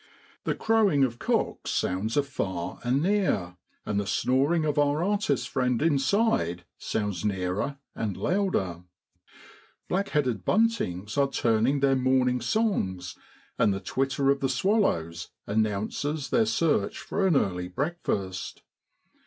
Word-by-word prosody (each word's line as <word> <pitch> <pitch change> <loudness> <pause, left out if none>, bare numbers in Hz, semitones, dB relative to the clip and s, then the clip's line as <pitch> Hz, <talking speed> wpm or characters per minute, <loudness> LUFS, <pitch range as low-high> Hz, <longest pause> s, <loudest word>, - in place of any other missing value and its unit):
The - - 0
crowing 210 -11 +3
of 120 -3 -1
cocks - - -1
sounds 105 +7 -1
afar 95 -11 -2
and 130 +4 +1
near: 170 - 0 0.3
and 100 - 0
the 100 - -3
snoring 140 +9 +2
of 150 -1 +1
our 145 +2 +2
artist 180 - 0
friend 125 -2 0
inside 140 - +1
sounds 105 -5 -2
nearer 100 +7 -1 0.2
and 105 -4 -3
louder. 100 - 0 1.0
Black 195 +2 -1
headed 125 - 0
buntings 145 - 0
are 140 - +4
tuning 120 +2 +1
their 135 -1 +4
morning 130 -1 +2
songs, 95 - -1 0.4
and 110 - +4
the 95 - -2
twitter 135 +4 0
of 140 - 0
the 135 - 0
swallows 125 - 0 0.2
announces 110 +8 -1
their 225 -2 +3
search 165 - +1
for 195 -1 -1
an 175 - +3
early 90 -8 0
breakfast. 100 - -3
130 Hz, 130 wpm, -27 LUFS, 100-160 Hz, 1.0 s, are